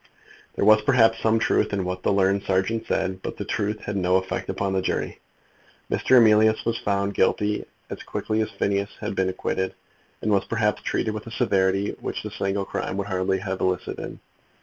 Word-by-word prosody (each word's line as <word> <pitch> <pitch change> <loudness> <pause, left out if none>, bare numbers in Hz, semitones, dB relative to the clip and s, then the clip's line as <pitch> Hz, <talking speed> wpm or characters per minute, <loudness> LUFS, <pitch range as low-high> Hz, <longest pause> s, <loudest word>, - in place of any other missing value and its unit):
There - - 0
was, 110 0 +7
perhaps, 120 -4 +4
some 110 0 +2
truth 110 - +1
in 95 -2 -1
what 90 0 -3
the - - +1
learned 100 0 +2
serjeant 95 +4 0
said, 95 -1 -1
but - - -5
the - - -4
truth 105 +1 -2
had 105 - -4
no 90 -1 +2
effect 95 0 -1
upon 95 -1 -1
the 95 - +1
jury. - - -2 0.7
Mr. 130 - +4
Emilius 110 -1 +5
was 115 0 0
found 100 0 0
guilty 105 +2 +1 0.2
as - - -7
quickly 110 0 -2
as 110 - -1
Phineas 100 0 -1
Finn - - -19
had - - -5
been 95 -1 +1
acquitted, 95 0 -2 0.5
and 110 - +1
was, 100 -1 +3
perhaps, 105 -2 0
treated 110 - -1
with 110 +1 -7
a - - -7
severity 100 -4 +1
which - - -4
the - - -6
single 100 0 -2
crime 95 - -3
would 100 - -2
hardly 95 0 0
have 95 0 -4
elicited. 90 0 -2
100 Hz, 195 wpm, -24 LUFS, 95-110 Hz, 0.7 s, was